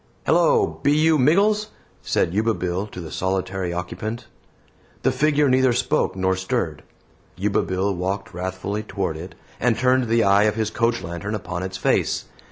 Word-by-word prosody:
"Hello, 460 Hz, -5 st, +3 dB
be 145 Hz, -, +3 dB
you 155 Hz, 0 st, +4 dB
Miggles?" 205 Hz, +10 st, +3 dB, 0.3 s
said 85 Hz, -, 0 dB
Yuba 110 Hz, +2 st, +1 dB
Bill 90 Hz, +3 st, -2 dB
to 100 Hz, -, -9 dB
the 80 Hz, -3 st, -7 dB
solitary 95 Hz, -1 st, -2 dB
occupant. 105 Hz, +7 st, -5 dB, 0.8 s
The -, -, +3 dB
figure 150 Hz, -1 st, +2 dB
neither 130 Hz, -1 st, +4 dB
spoke 130 Hz, +2 st, 0 dB
nor 95 Hz, 0 st, +1 dB
stirred. 95 Hz, 0 st, -2 dB, 0.5 s
Yuba 100 Hz, +2 st, +1 dB
Bill 95 Hz, +2 st, -1 dB
walked 95 Hz, +2 st, -3 dB
wrathfully 95 Hz, +3 st, -3 dB
toward 95 Hz, -6 st, -3 dB
it, 85 Hz, +2 st, -8 dB, 0.2 s
and 120 Hz, -1 st, +2 dB
turned 130 Hz, 0 st, +3 dB
the 115 Hz, 0 st, +3 dB
eye 100 Hz, +1 st, +5 dB
of 105 Hz, -, +1 dB
his 110 Hz, -1 st, -1 dB
coach 115 Hz, +1 st, 0 dB
lantern 85 Hz, +6 st, -4 dB
upon 90 Hz, -3 st, -5 dB
its 95 Hz, 0 st, -4 dB
face. -, -, +1 dB
100 Hz, 165 wpm, -23 LUFS, 95-125 Hz, 0.8 s, eye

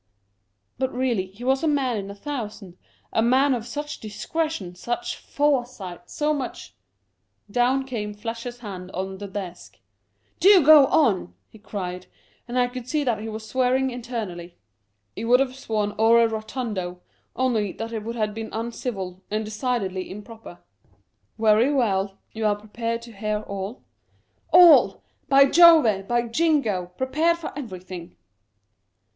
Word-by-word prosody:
" 100 Hz, 0 st, -49 dB
But, 260 Hz, -1 st, 0 dB
really, 240 Hz, -7 st, 0 dB
he 200 Hz, +6 st, -13 dB
was 265 Hz, +1 st, +2 dB
a 325 Hz, -, 0 dB
man 275 Hz, -5 st, +1 dB
in 200 Hz, -2 st, -4 dB
a 200 Hz, -, -8 dB
thousand, 210 Hz, -7 st, -6 dB, 0.4 s
a -, -, +3 dB
man 260 Hz, +4 st, +4 dB
of 235 Hz, -2 st, -3 dB
such 295 Hz, 0 st, -5 dB
discretion, 215 Hz, -, -3 dB
such 240 Hz, +7 st, -3 dB
foresight, 245 Hz, -11 st, -2 dB
so 300 Hz, 0 st, 0 dB
much 270 Hz, -4 st, -5 dB, 0.4 s
" 205 Hz, -, -30 dB
Down 265 Hz, +2 st, +2 dB
came 210 Hz, -5 st, -4 dB
Fletcher's 235 Hz, +3 st, -6 dB
hand 185 Hz, -5 st, -7 dB
on 190 Hz, +1 st, -4 dB
the 205 Hz, -, -6 dB
desk, 190 Hz, -3 st, -7 dB, 0.3 s
" -, -, -43 dB
Do 380 Hz, -5 st, +7 dB
go 300 Hz, -3 st, +9 dB
on! 195 Hz, -, +2 dB
" -, -, -48 dB
he 220 Hz, -, -15 dB
cried; 180 Hz, -3 st, -6 dB, 0.4 s
and 245 Hz, +1 st, -3 dB
I 250 Hz, -, +4 dB
could 245 Hz, 0 st, -7 dB
see 300 Hz, -1 st, +1 dB
that 235 Hz, -6 st, 0 dB
he 220 Hz, +1 st, -5 dB
was 220 Hz, 0 st, -7 dB
swearing 260 Hz, +2 st, +1 dB
internally; 215 Hz, -8 st, -6 dB, 0.6 s
he -, -, -5 dB
would 245 Hz, +2 st, +5 dB
have 265 Hz, -1 st, 0 dB
sworn 215 Hz, -5 st, -2 dB
ore 230 Hz, +1 st, +6 dB
rotundo, 215 Hz, -5 st, -4 dB, 0.3 s
only 230 Hz, -6 st, 0 dB
that 225 Hz, +1 st, -6 dB
it 220 Hz, -, -3 dB
would 230 Hz, +2 st, -5 dB
have 215 Hz, -2 st, -1 dB
been 220 Hz, 0 st, -6 dB
uncivil, 220 Hz, -5 st, -4 dB
and 215 Hz, +1 st, -2 dB
decidedly 215 Hz, -4 st, -2 dB
improper. 210 Hz, -1 st, -10 dB, 0.4 s
" 100 Hz, 0 st, -46 dB
Very 220 Hz, +4 st, +4 dB
well; 200 Hz, -7 st, 0 dB
you 220 Hz, -, -5 dB
are 205 Hz, -, +2 dB
prepared 230 Hz, +2 st, -4 dB
to 235 Hz, -1 st, -11 dB
hear 210 Hz, +1 st, -2 dB
all? 200 Hz, +3 st, -6 dB, 0.2 s
" -, -, -40 dB
" -, -, -40 dB
All! 350 Hz, -2 st, +7 dB, 0.3 s
by 275 Hz, 0 st, +7 dB
Jove! 280 Hz, -, +6 dB
by 240 Hz, 0 st, +1 dB
Jingo! 235 Hz, -, +1 dB
prepared 315 Hz, +6 st, +1 dB
for 335 Hz, -, -7 dB
every 225 Hz, -11 st, -7 dB
thing." 180 Hz, -2 st, -9 dB
225 Hz, 165 wpm, -24 LUFS, 200-260 Hz, 0.6 s, go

